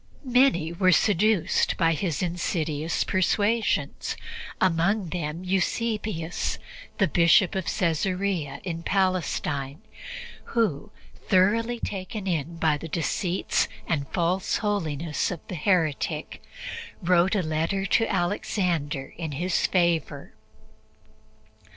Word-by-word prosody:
Many 245 -10 +3
were 185 +1 +3
seduced 205 -1 +2
by 165 0 +3
his 165 -1 -1
insidious 165 -3 -1
persuasions, 205 +4 0 0.4
among 185 +2 +2
them 165 0 -4
Eusebius, 195 -2 -1 0.4
the 195 - +3
Bishop 170 +3 +4
of 190 -2 -2
Caesarea 180 -4 -1
in 165 -3 -4
Palestine, 165 -7 -1 0.8
who, 190 -12 +1 0.4
thoroughly 225 +5 +3
taken 195 0 -5
in 165 -2 -2
by 160 -2 +2
the 165 - -6
deceits 175 +3 0 0.2
and 140 -4 -1
false 180 +3 0
holiness 165 -7 -1
of 175 - -4
the - - -6
heretic, 160 -3 0 0.6
wrote 180 +3 +3
a 195 - +1
letter 165 +5 -1
to 225 +3 +2
Alexander 170 -6 -1
in 160 -4 -3
his 175 +5 +1
favor. 170 -5 0
175 Hz, 100 wpm, -26 LUFS, 160-195 Hz, 0.8 s, Bishop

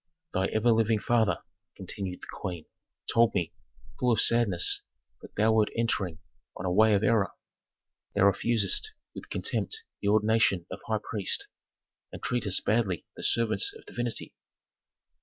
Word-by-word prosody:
"Thy 95 - +1
ever 110 +2 +2
living 110 0 +3
father," 110 -4 +1 0.3
continued 95 -1 -6
the - - -10
queen, 90 -5 -4 0.5
"told 115 -1 +4
me, 85 -4 -1 0.5
full 125 -1 +2
of 110 - +2
sadness, 115 -8 +3 0.4
that - - -13
thou 110 +2 +3
wert 110 -1 +3
entering 100 -7 0 0.4
on 95 - -5
a 90 - 0
way 110 +3 +5
of 100 - +1
error. 105 -3 +3 0.8
Thou 100 - +3
refusest 110 - +2 0.2
with - - -10
contempt 445 0 -2 0.2
the 100 - -2
ordination 105 -3 +3
of 95 - -5
high 110 - +1
priest, 105 -4 0 0.7
and - - -8
treatest 110 -7 0
badly 105 -5 +1
the - - -9
servants 110 -3 +2
of - - -18
divinity." 120 -1 -4
110 Hz, 145 wpm, -28 LUFS, 95-115 Hz, 0.8 s, way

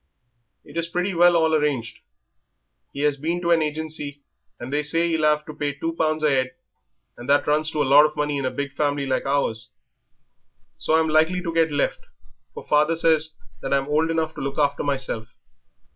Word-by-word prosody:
It - - -11
is 165 0 0
pretty 180 +3 -2
well 175 0 +5
all 160 -1 +2
arranged; 145 -7 -1 0.9
he 140 - -6
has 145 -1 +1
been 165 +5 -2
to 170 -1 0
an 165 -1 +4
agency 150 -2 -4 0.4
and 120 +3 -7
they 150 - +1
say 165 +3 +1
he'll 160 -2 +2
'ave 150 0 +2
to 155 - -8
pay 145 -1 -2
two 165 +4 -4
pounds 155 -1 0
a 140 -3 +3
'ead, 130 0 -8 0.6
and 120 - -9
that 145 +1 +4
runs 155 +1 +1
to 150 -2 0
a - - -1
lot 145 +3 +7
of 150 - -11
money 150 -1 -1
in 135 - -3
a - - +1
big 140 0 -5
family 145 -1 -1
like 130 0 -1
ours. 135 -6 -1 1.1
So 160 - +1
I'm 160 0 +3
likely 160 +4 +2
to 165 -2 -3
get 165 -1 +2
left, 145 -1 0 0.6
for - - -9
father 150 +2 +3
says 160 -1 +2 0.3
that 135 +1 0
I'm 135 0 -1
old 155 +2 +2
enough 160 -1 -1
to - - -8
look 140 0 -4
after 145 -1 +1
myself. 130 -5 -3
150 Hz, 205 wpm, -23 LUFS, 140-160 Hz, 1.1 s, lot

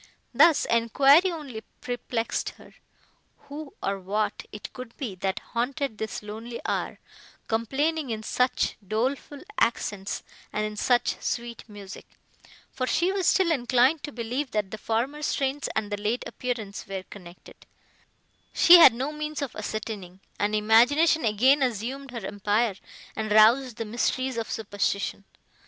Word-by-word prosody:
Thus, 305 +5 +5
enquiry 275 - +5
only 280 -9 -7 0.2
perplexed 245 -2 -3
her. - - -16 0.7
Who, 290 0 -9
or 195 0 -1
what, 205 +3 -2
it 210 - -8
could 255 -2 -10
be 245 -9 -4
that 190 +1 -2 0.2
haunted 250 0 -2
this 220 -1 -4
lonely 225 +3 -7
hour, - - -2 0.5
complaining 275 +7 0
in 220 -1 -3
such 250 +3 0
doleful 260 +7 -2 0.2
accents 205 -4 -1 0.3
and 215 - -1
in 215 0 -5
such 245 +3 +1
sweet 235 -1 -4
music 200 -2 -10 0.6
(for 255 - -3
she 345 +8 +2
was 385 -3 0
still 375 -3 +4
inclined 255 +2 +3
to 295 - -6
believe, 245 +3 -3
that 210 -3 -1
the 220 - -6
former 245 +8 -1
strains 275 -1 -1
and 215 -1 -2
the 205 0 -3
late 220 +4 -1
appearance 225 -5 -5
were 195 -1 -5
connected), 180 -3 -14 0.9
she 350 +1 +9
had 260 -8 +9
no 265 +5 -2
means 300 0 -4
of 270 - -6
ascertaining; 210 -4 -5 0.2
and 210 +1 +1
imagination 245 +10 +4
again 255 +7 +4
assumed 260 +3 -2
her 235 -5 -6
empire, 205 +2 0 0.4
and 215 -1 -3
roused 230 +3 +5
the 225 - -3
mysteries 255 +3 -1
of 230 - -3
superstition. 200 -1 -2
235 Hz, 145 wpm, -26 LUFS, 210-275 Hz, 0.9 s, she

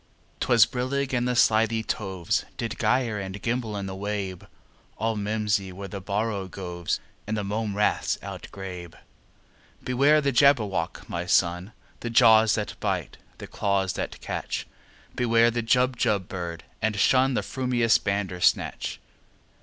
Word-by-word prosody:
'Twas 115 -3 +5
brillig, 130 +3 -2
and 120 0 +1
the 125 - 0
slithy 110 -1 +3
toves 95 -6 -2
Did 115 0 -3
gyre 120 -4 +1
and 95 0 -6
gimble 115 -1 -2
in 100 - -4
the 95 - -5
wabe; 95 -2 -4 0.5
All 115 0 0
mimsy 105 -2 -1
were 100 +2 -7
the 100 +1 -6
borogoves, 95 -4 -3 0.3
And 110 +1 -1
the 105 - -2
mome 105 0 -2
raths 105 - +1
outgrabe. 90 -3 -8 0.9
"Beware 140 +4 +4
the 140 -2 +1
Jabberwock, 110 -11 +2
my 85 +1 -4
son! 90 0 +2 0.3
The 120 - -4
jaws 110 -1 +6
that 105 -1 -4
bite, - - -2 0.2
the - - -8
claws 100 -2 0
that - - -5
catch! - - -4 0.5
Beware 115 -1 +3
the 120 0 -1
Jubjub 115 -5 +1
bird, 85 -3 -5 0.2
and 105 -1 0
shun 130 +4 +4
The - - +1
frumious 125 -3 +2
Bandersnatch!" 95 -3 0
105 Hz, 140 wpm, -26 LUFS, 95-120 Hz, 0.9 s, jaws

